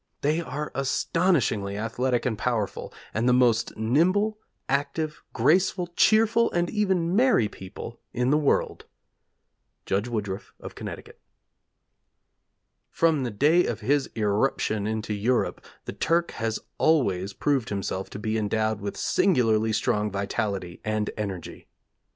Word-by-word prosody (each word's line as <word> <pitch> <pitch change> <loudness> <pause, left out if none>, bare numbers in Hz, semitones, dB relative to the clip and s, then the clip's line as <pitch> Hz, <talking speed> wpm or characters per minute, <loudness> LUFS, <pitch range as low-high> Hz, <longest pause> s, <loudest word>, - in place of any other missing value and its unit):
They 155 +4 +1
are 150 0 -5
astonishingly 135 - +1
athletic 120 +3 -1
and 120 -4 0
powerful; 110 -3 -2 0.2
and 115 +3 +1
the - - +5
most 120 -2 +2
nimble, 185 - +2 0.3
active, 145 +3 -1
graceful, 180 +1 +2
cheerful, 225 +1 +4
and 175 0 0
even 190 -5 +1
merry 240 - +4
people 95 -2 -9
in 125 +2 0
the 150 - +4
world. 145 - 0 1.0
Judge 100 +4 0
Woodruff, 105 -4 -4
of - - -9
Connecticut.' - - -8 1.7
'From 160 -3 +2
the 125 - -1
day 150 +11 +3
of - - -3
his 135 +5 +1
irruption 105 -1 0
into 110 -1 -2
Europe 115 +5 0 0.2
the - - -5
Turk 170 +1 +1
has 115 -1 -2 0.2
always 100 - +2
proved 140 -5 0
himself 95 -1 -3
to - - -7
be 110 +1 -1
endowed 110 0 0
with 100 0 -5
singularly 115 - +2
strong 105 -1 0
vitality 100 -2 -3
and 110 -1 -1
energy. 100 -6 -6
120 Hz, 125 wpm, -26 LUFS, 105-155 Hz, 1.7 s, the